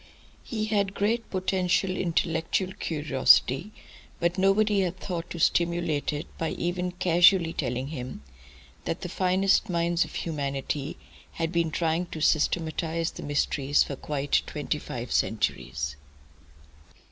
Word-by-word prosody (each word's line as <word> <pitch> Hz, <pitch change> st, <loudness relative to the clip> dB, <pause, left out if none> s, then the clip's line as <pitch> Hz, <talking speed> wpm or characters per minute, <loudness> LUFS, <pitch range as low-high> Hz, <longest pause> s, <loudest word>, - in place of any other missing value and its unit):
He 215 Hz, -4 st, -3 dB
had 200 Hz, -2 st, 0 dB
great 225 Hz, +3 st, 0 dB
potential 185 Hz, 0 st, +1 dB
intellectual 170 Hz, +2 st, 0 dB
curiosity, 150 Hz, -, +3 dB, 0.5 s
but 170 Hz, +1 st, +1 dB
nobody 200 Hz, +2 st, +3 dB
had 185 Hz, -1 st, -1 dB
thought 175 Hz, -3 st, -5 dB
to -, -, -6 dB
stimulate 170 Hz, -3 st, +1 dB
it 150 Hz, 0 st, -4 dB
by 165 Hz, -, 0 dB
even 180 Hz, +1 st, -2 dB
casually 175 Hz, -1 st, +4 dB
telling 125 Hz, 0 st, -2 dB
him 130 Hz, -, -6 dB, 0.6 s
that 165 Hz, -, -3 dB
the 180 Hz, -, -4 dB
finest 190 Hz, +3 st, +2 dB
minds 170 Hz, 0 st, +1 dB
of -, -, -10 dB
humanity 140 Hz, -1 st, -3 dB, 0.4 s
had 165 Hz, -1 st, -2 dB
been 170 Hz, -2 st, +1 dB
trying 165 Hz, +2 st, 0 dB
to 160 Hz, -, -7 dB
systematise 160 Hz, +1 st, +1 dB
the -, -, -9 dB
mysteries 145 Hz, -1 st, +1 dB
for 140 Hz, -, -5 dB
quite 145 Hz, +1 st, 0 dB
twenty -, -, -2 dB
five -, -, -6 dB
centuries. 70 Hz, +2 st, -1 dB
170 Hz, 125 wpm, -27 LUFS, 150-185 Hz, 0.6 s, casually